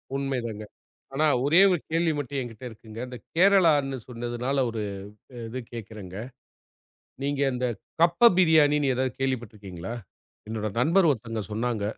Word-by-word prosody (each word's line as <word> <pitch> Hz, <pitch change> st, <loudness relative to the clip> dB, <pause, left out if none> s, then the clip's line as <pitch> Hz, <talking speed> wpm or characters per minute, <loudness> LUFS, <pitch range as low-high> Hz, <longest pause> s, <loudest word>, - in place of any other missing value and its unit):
உண்மைதாங்க. 125 Hz, -6 st, -3 dB, 0.5 s
ஆனா, 150 Hz, +3 st, +2 dB, 0.2 s
ஒரே 165 Hz, +6 st, +6 dB
ஒரு 175 Hz, -, +1 dB
கேள்வி 165 Hz, 0 st, +2 dB
மட்டும் 140 Hz, 0 st, -3 dB
என்கிட்ட 120 Hz, -2 st, -9 dB
இருக்குங்க. 110 Hz, 0 st, -11 dB
அந்தக் 125 Hz, -3 st, -10 dB
கேரளான்னு 165 Hz, -8 st, +4 dB
சொன்னதுனால 120 Hz, +2 st, -2 dB
ஒரு 115 Hz, -1 st, -4 dB, 0.7 s
இது 130 Hz, +3 st, -5 dB
கேக்குறேங்க. 105 Hz, -5 st, -8 dB, 1.1 s
நீங்க 140 Hz, 0 st, -1 dB
அந்தக் 125 Hz, -4 st, -2 dB, 0.2 s
கப்ப 170 Hz, +8 st, +6 dB
பிரியாணின்னு 150 Hz, -5 st, +4 dB
ஏதாவது 130 Hz, 0 st, -1 dB
கேள்விப்பட்டிருக்கீங்களா? 105 Hz, -7 st, -4 dB, 0.6 s
என்னோட 110 Hz, -1 st, -2 dB
நண்பர் 170 Hz, +8 st, +4 dB
ஒருத்தங்க 115 Hz, -4 st, -2 dB
சொன்னாங்க. 110 Hz, 0 st, -1 dB
125 Hz, 120 wpm, -26 LUFS, 115-145 Hz, 1.1 s, ஒரே